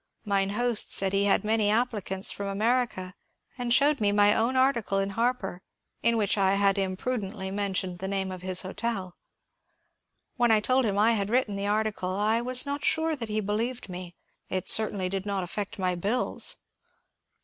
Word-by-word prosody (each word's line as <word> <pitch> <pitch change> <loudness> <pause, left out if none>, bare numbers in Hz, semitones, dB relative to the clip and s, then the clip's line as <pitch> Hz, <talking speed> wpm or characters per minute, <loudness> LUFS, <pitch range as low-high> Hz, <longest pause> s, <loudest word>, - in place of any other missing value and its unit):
Mine 195 -1 +1
host 235 +2 +2
said 195 0 +3
he 200 0 +2
had 200 - +2
many 215 -1 +2
applicants 210 -4 +2
from 200 - -5
America, 210 -2 -1 0.4
and 245 -2 -4
showed 285 +1 +3
me 205 -1 +2
my 205 0 +4
own 230 +4 0
article 260 -6 +1
in 195 0 0
^^ - - -7
Harper 225 -4 -2 0.2
" - - -51
in 235 0 +2
which 205 -1 0
I 195 0 +3
had 200 0 +2
imprudently 190 0 -3
mentioned 190 -3 -2
the 190 - -4
name 190 -1 -2
of 185 -1 -7
his 185 0 +2
hotel. 190 -2 -4 1.2
When 240 -1 +2
I 220 -1 +5
told 255 +4 +1
him 200 -1 -1
I 215 +3 +5
had 205 -3 -1
written 235 -3 0
the 200 0 -3
article, 210 -3 -1
I 215 +3 +1
was 255 +2 +2
not 285 0 -4
sure 320 0 +1
that 230 -6 -6
he 215 0 -1
believed 220 +3 -3
me; 180 -1 -8 0.3
it 185 -1 -3
certainly 205 -4 +2
did 195 +2 -4
not 200 -2 -1
affect 205 +5 -5
my 185 -2 0
bills. 215 - 0
205 Hz, 185 wpm, -27 LUFS, 195-235 Hz, 1.2 s, I